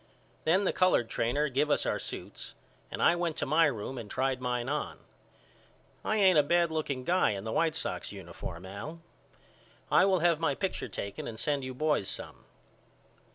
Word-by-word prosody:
Then 180 +5 +4
the - - +1
colored 185 -11 +3
trainer 140 +6 +1
give 140 +3 +1
us 145 - +2
our - - 0
suits - - -7 0.3
and - - -3
I 170 - +6
went 170 -2 -2
to - - -1
my 155 +3 +4
room 125 0 -4
and 105 - -8
tried 130 0 0
mine 125 -1 -1
on. 150 +2 -2 1.1
I 215 - 0
ain't 190 -6 +6
a - - +8
bad 170 +3 +2
looking 145 -5 -2
guy 175 - +3
in 100 -1 -5
the 110 - -4
White 165 +4 +1
Sox - - -2
uniform 85 +2 -8
Al. 105 - -7 0.9
I - - +6
will 190 -3 +3
have 170 -2 +3
my 155 -4 +1
picture 190 +3 -3
taken 100 0 -5
and 110 -1 -7
send 140 +3 0
you 130 0 -5
boys 150 -8 +1
some. - - -5
145 Hz, 185 wpm, -30 LUFS, 125-170 Hz, 1.1 s, a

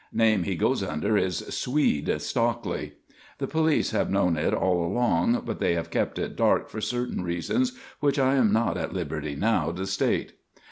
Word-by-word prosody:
Name 110 -5 +3
he - - -1
goes - - +1
under 75 +8 -1
is 95 -5 0
'Swede' 125 - +1
Stockley. 120 0 -2 0.4
The - - -2
police 160 -1 +1
have 110 - 0
known 95 -3 +2
it 80 +1 0
all 90 -2 +1
along 115 +2 +1
but - - -4
they 85 - +2
have 85 0 -4
kept - - -1
it - - -3
dark - - +2
for 110 - -6
certain 125 -4 -2
reasons 90 - 0 0.3
which 145 -1 +1
I 135 -1 +3
am 125 -7 +3
not 110 +2 +1
at - - -4
liberty 75 -2 -3
now 85 -2 +1
to 90 +3 -4
state. 95 0 0
105 Hz, 180 wpm, -26 LUFS, 85-120 Hz, 0.4 s, Name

